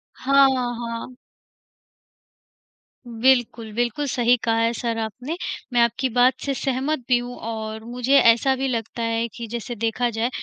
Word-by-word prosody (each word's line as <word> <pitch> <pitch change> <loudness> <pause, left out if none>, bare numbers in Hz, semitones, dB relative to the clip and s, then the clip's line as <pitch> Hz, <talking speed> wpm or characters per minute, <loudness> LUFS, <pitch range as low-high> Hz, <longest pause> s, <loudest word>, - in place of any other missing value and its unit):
हाँ, 275 +1 +4 0.3
हाँ। 235 +1 -6 1.9
बिल्कुल, 235 -2 +1
बिल्कुल 240 +5 -1
सही 245 -1 +3
कहा 225 -1 +1
है 230 0 +2
सर 230 -1 -3
आपने, 250 +8 -4 0.4
मैं 240 - +4
आपकी 235 +3 +1
बात 245 +2 +4
से 275 - 0
सहमत 270 +3 -1
भी 250 -1 +4
हूँ। 245 0 -7
और 220 -1 -5
मुझे 250 +3 -1
ऐसा 235 +3 +4
भी 265 +1 -2
लगता 230 -1 -3
है 230 0 0
कि 235 - -6
जैसे 235 +2 -5
देखा 230 +2 0
जाए 230 +2 -1
240 Hz, 150 wpm, -23 LUFS, 230-255 Hz, 1.9 s, हाँ